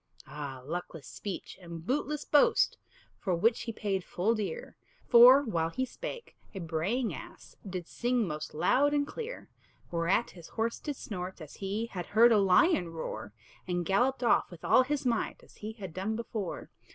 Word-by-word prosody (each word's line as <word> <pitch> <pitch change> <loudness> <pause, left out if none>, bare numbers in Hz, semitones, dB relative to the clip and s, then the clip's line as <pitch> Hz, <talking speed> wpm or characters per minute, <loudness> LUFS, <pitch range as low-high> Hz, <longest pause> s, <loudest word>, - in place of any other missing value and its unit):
Ah, 140 -4 -7
luckless 165 -1 -5
speech, 185 - -7
and 170 -2 -8
bootless 295 +5 -1
boast! 290 - +4 0.4
For 185 -4 0
which 225 +7 +2
he 230 - -4
paid 195 -4 -2
full 195 +7 0
dear; 230 - -4 0.3
For, 250 +4 +9
while 165 -10 0
he 260 +10 -2
spake, 485 - -8 0.2
a - - -4
braying 180 +9 -1
ass - - -11
Did 180 -2 -5
sing 240 -3 0
most 150 -1 -5
loud 285 - +3
and 285 0 +2
clear; 470 +9 -7 0.4
Whereat 170 +7 +1
his 170 -3 -12
horse 230 +1 -2
did 295 -2 -4
snort, 185 -6 -6
as 155 -3 -10
he 205 +3 -2
Had 185 -6 -6
heard 230 +3 +6
a 215 - +6
lion 195 - +4
roar, 110 -10 -6 0.4
And 175 -1 -1
galloped 245 +9 +2
off 235 - +3
with 175 -3 -11
all - - +6
his 275 +1 -1
might, 235 -3 -1
As - - -19
he 215 +1 -6
had 195 -7 -8
done 195 +5 -2
before. 220 -5 -5
205 Hz, 175 wpm, -30 LUFS, 175-245 Hz, 0.4 s, For